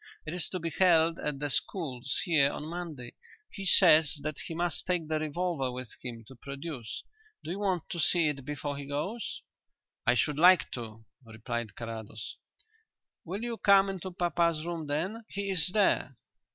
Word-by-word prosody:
It 155 Hz, -, -4 dB
is 180 Hz, -2 st, +1 dB
to 185 Hz, -, -3 dB
be 165 Hz, -1 st, -3 dB
held 165 Hz, -2 st, +4 dB
at 150 Hz, -2 st, -2 dB
the 145 Hz, 0 st, -2 dB
schools 130 Hz, -, -1 dB
here 155 Hz, -6 st, +4 dB
on 150 Hz, -, -5 dB
Monday. 160 Hz, -7 st, -6 dB, 0.4 s
He 195 Hz, -2 st, -5 dB
says 160 Hz, -5 st, +6 dB
that 155 Hz, -1 st, -3 dB
he 165 Hz, -, -5 dB
must 175 Hz, -2 st, -1 dB
take 175 Hz, -4 st, 0 dB
the 155 Hz, 0 st, 0 dB
revolver 155 Hz, -2 st, -1 dB
with 125 Hz, -1 st, -7 dB
him 115 Hz, -3 st, -6 dB
to 130 Hz, -, -12 dB
produce. 140 Hz, -1 st, -6 dB, 0.4 s
Do -, -, -5 dB
you 190 Hz, -, -3 dB
want 190 Hz, -4 st, 0 dB
to 170 Hz, -, -3 dB
see 165 Hz, +1 st, +3 dB
it 140 Hz, -3 st, -2 dB
before 145 Hz, 0 st, -4 dB
he 140 Hz, -, -6 dB
goes?" 190 Hz, +11 st, -3 dB, 0.7 s
"I -, -, +5 dB
should 150 Hz, +3 st, +1 dB
like 180 Hz, +2 st, +6 dB
to," 110 Hz, -2 st, -7 dB, 0.2 s
replied 115 Hz, -1 st, -5 dB
Carrados. 110 Hz, -2 st, -6 dB, 0.9 s
"Will 195 Hz, +6 st, -4 dB
you 235 Hz, -1 st, -3 dB
come 195 Hz, -1 st, +5 dB
into 190 Hz, -1 st, -5 dB
papa's 170 Hz, -2 st, +1 dB
room 170 Hz, -3 st, -4 dB
then? 185 Hz, +11 st, -2 dB
He 200 Hz, 0 st, -3 dB
is 165 Hz, -5 st, +2 dB
there." 190 Hz, -10 st, +2 dB
155 Hz, 175 wpm, -30 LUFS, 135-180 Hz, 0.9 s, says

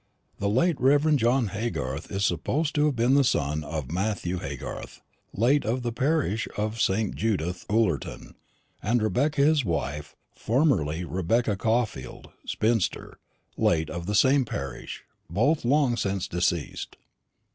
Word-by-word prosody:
The 100 Hz, -, 0 dB
late 135 Hz, -, +2 dB
Rev. 145 Hz, +4 st, +4 dB
John 120 Hz, -2 st, +2 dB
Haygarth 90 Hz, -, -4 dB
is 100 Hz, 0 st, 0 dB
supposed 140 Hz, -, 0 dB
to 150 Hz, 0 st, +3 dB
have 145 Hz, -, 0 dB
been 120 Hz, +3 st, +2 dB
the 140 Hz, 0 st, +5 dB
son 75 Hz, -, 0 dB
of 75 Hz, -3 st, -5 dB
Matthew 95 Hz, -1 st, -1 dB
Haygarth, -, -, -7 dB, 0.3 s
late 130 Hz, +7 st, +2 dB
of 120 Hz, +3 st, -1 dB
the 120 Hz, -, -1 dB
parish 130 Hz, -4 st, 0 dB
of 110 Hz, +2 st, -2 dB
St. 100 Hz, +1 st, +1 dB
Judith, 90 Hz, -5 st, -2 dB
Ullerton, 105 Hz, -, -1 dB, 0.5 s
and 120 Hz, +4 st, +1 dB
Rebecca 140 Hz, +7 st, +1 dB
his 150 Hz, -1 st, +4 dB
wife, 75 Hz, -, -3 dB, 0.2 s
formerly 100 Hz, -, +1 dB
Rebecca 100 Hz, +6 st, 0 dB
Caulfield, 110 Hz, -, -2 dB, 0.2 s
spinster, 110 Hz, -2 st, -1 dB, 0.4 s
late 80 Hz, -2 st, +1 dB
of 85 Hz, +1 st, -5 dB
the 105 Hz, -, 0 dB
same 130 Hz, +7 st, +5 dB
parish; 70 Hz, -, -6 dB, 0.3 s
both 130 Hz, -, +1 dB
long 130 Hz, 0 st, +3 dB
since 95 Hz, -4 st, -2 dB
deceased." 85 Hz, -3 st, -2 dB
110 Hz, 135 wpm, -26 LUFS, 85-130 Hz, 0.5 s, the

